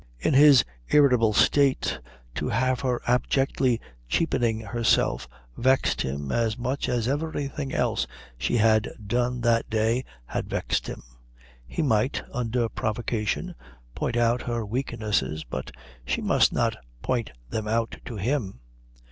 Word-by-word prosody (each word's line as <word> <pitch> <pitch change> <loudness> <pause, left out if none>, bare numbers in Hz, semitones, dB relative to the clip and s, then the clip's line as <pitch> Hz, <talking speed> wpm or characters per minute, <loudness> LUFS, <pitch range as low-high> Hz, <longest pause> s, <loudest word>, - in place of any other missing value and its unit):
In 145 - 0
his 140 -5 +7 0.2
irritable 125 -7 +5
state, 130 - +3 0.3
to - - -2
have 130 +3 +1
her 125 -3 -1
abjectly 125 0 +1 0.3
cheapening 120 - +1
herself 105 - +1 0.3
vexed 130 +2 +2
him 70 +1 -3
as 115 -2 0
much 130 +3 -2
as 120 -2 0
everything 145 -1 -2
else - - 0 0.3
she 60 - 0
had 110 -1 +3 0.2
done 120 +3 0
that 115 -1 +2
day 115 +3 +1 0.2
had - - -4
vexed - - -1
him. - - -7 0.6
He 110 - -2
might, 120 -2 +1
under 120 -1 0
provocation, 115 - -2 0.4
point 120 - -2
out 120 +1 +2
her 120 -2 -2
weaknesses, 105 - -1
but 65 +2 -5 0.3
she - - -1
must - - +3
not - - 0 0.3
point 120 -4 -1 0.2
them 110 -1 -2
out 115 +1 -1
to 120 - -6
him. 105 - -2
120 Hz, 130 wpm, -26 LUFS, 110-130 Hz, 0.6 s, his